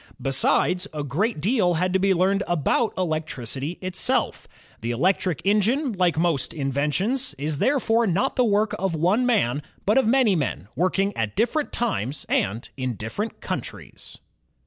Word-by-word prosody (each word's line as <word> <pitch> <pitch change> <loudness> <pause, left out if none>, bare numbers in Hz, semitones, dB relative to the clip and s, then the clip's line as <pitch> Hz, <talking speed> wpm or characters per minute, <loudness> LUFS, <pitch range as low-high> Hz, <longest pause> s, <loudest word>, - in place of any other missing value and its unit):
Besides, 180 +7 +2
a 150 - -2
great 180 - -1
deal 185 - +2
had 180 +2 0
to 190 - +3
be 195 +1 +2
learned 190 +2 +2
about 175 - +1
electricity 155 -3 -3
itself. 185 -1 -1 0.3
The 115 - -4
electric 175 +6 0
engine, 225 +7 +2
like 180 -4 +1
most 165 -5 0
inventions, 150 - -1
is 145 +1 -3
therefore 235 -4 +2
not 200 +9 0
the 250 - +3
work 215 -1 +2
of 190 -3 -1
one 190 +10 +2
man, 150 - +1 0.2
but 210 +6 +4
of 260 - +1
many 240 -5 +4
men 130 - -2
working 190 +3 0
at 110 -2 -2
different 265 +8 0
times 145 - -2
and 110 +5 0
in 130 -3 -3
diflEerent 155 - -5
countries. - - -6
185 Hz, 150 wpm, -24 LUFS, 145-215 Hz, 0.3 s, but